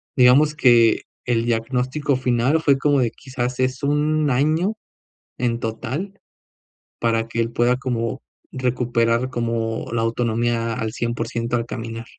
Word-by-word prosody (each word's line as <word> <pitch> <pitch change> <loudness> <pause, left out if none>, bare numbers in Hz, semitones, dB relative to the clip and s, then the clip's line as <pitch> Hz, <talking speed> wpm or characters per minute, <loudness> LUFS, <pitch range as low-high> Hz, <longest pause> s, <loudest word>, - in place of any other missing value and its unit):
digamos 140 +4 +5
que 120 -5 +5 0.2
el 115 -1 +1
diagnóstico 125 +5 0
final 130 +4 +1
fue 140 -3 +3
como 145 0 +2
de 115 -2 +1
quizás 125 -1 -5
es 130 0 -1
un 150 +1 +1
año 155 - +1 0.7
en 120 -2 0
total, 130 - -4 0.8
para 115 -1 +1
que 115 - -5
él 115 0 -2
pueda 120 +1 +2
como, 125 -1 -3 0.3
recuperar 120 -1 0
como 115 -2 -2
la 115 - 0
autonomía 115 0 0
a 125 - -5
al 110 -1 -3
cien 120 0 -2
por - - -3
ciento 115 +1 -2
al 115 - -2
caminar. 115 -1 -6
120 Hz, 150 wpm, -22 LUFS, 115-130 Hz, 0.8 s, digamos